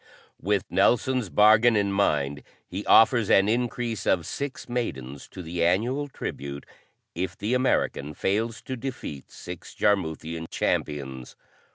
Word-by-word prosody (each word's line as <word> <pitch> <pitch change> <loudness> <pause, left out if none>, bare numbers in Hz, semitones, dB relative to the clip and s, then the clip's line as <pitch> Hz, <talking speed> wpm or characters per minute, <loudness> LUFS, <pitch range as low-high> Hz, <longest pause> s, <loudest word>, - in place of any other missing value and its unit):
With 100 +2 +1
Nelson's 120 +4 +2
bargain 110 +4 +5
in 100 -1 +1
mind 75 -8 +1 0.3
he 95 +3 -5
offers 115 -1 +5
an 95 +1 +5
increase 120 -1 -1
of 85 -4 +2
six 140 +7 -5
maidens 70 - -4
to 90 - -9
the 85 +1 -2
annual 120 +12 +1
tribute, 70 - -6 0.5
if 85 0 -4
the 105 +5 -2
American 100 - 0
fails 110 +3 -1
to 130 - -4
defeat 125 - -6
six 90 -1 -9
Jarmuthian 80 -4 0
champions. 65 -4 -2
100 Hz, 130 wpm, -26 LUFS, 80-115 Hz, 0.5 s, bargain